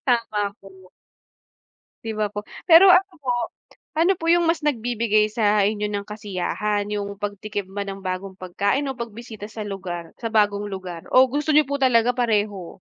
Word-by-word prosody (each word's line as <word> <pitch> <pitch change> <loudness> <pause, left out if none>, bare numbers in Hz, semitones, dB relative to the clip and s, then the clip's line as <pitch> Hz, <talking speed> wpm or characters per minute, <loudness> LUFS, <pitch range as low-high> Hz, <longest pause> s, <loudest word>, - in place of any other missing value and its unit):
Tama 215 -4 +1
po. 190 -1 -16 1.1
'Di 225 - -3
ba 215 - +1
po? 205 0 -4 0.3
Pero 345 +3 +9
ano 370 +1 +4
po, 255 -3 -1 0.6
ano 340 +4 +4
po 330 - -5
yung 345 0 +4
mas 330 - +1
nagbibigay 225 -5 +1
sa 210 -2 +2
inyo 210 +1 0
ng 205 -1 -3
kasiyahan, 210 0 -2
yung 200 -1 -3
pagtikim 205 -1 -4
ba 200 +1 -3
ng 195 0 -7
bagong 185 +1 -4
pagkain 200 +8 -1
o 260 - -10
pagbisita 230 -2 -7
sa 220 0 -7
lugar? 185 -4 -6
Sa 230 - -3
bagong 205 -1 +2
lugar. 185 -4 -7
O 260 +1 +7
gusto 295 +2 0
niyo 305 - +7
po 280 0 -2
talaga 245 -2 +4
pareho? 210 -7 -1
210 Hz, 165 wpm, -23 LUFS, 200-240 Hz, 1.1 s, Pero